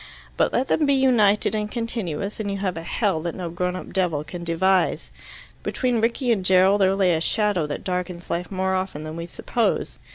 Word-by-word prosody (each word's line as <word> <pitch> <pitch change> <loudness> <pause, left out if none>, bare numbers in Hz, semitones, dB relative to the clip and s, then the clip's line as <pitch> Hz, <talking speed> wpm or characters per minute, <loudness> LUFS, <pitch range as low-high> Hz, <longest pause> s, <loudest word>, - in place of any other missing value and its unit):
But - - +2
let 260 +2 0
them 300 - +2
be 280 - +4
united 225 -7 +3
and 210 -1 -1
continuous, 210 -5 -4
and 210 -2 -2
you 200 - -2
have 190 -2 -2
a 165 - -5
hell 180 0 0
that 170 0 -4
no 175 -3 -5
grown 180 +1 -2
up 185 - -8
devil 175 -6 0
can 170 +3 -8
devise. 180 +2 +1 0.5
Between 245 -3 0
Rickie 240 +2 +1
and 205 -5 +1
Gerald 190 +2 +4
there 190 0 +4
lay 190 -3 +3
a 160 - 0
shadow 205 -4 +1
that 145 - -5
darkens 180 -1 -3
life 175 +1 -2
more 190 0 0
often 185 -5 -2
than 155 0 -6
we 170 0 -5
suppose. 230 +6 -1
190 Hz, 205 wpm, -23 LUFS, 175-210 Hz, 0.5 s, be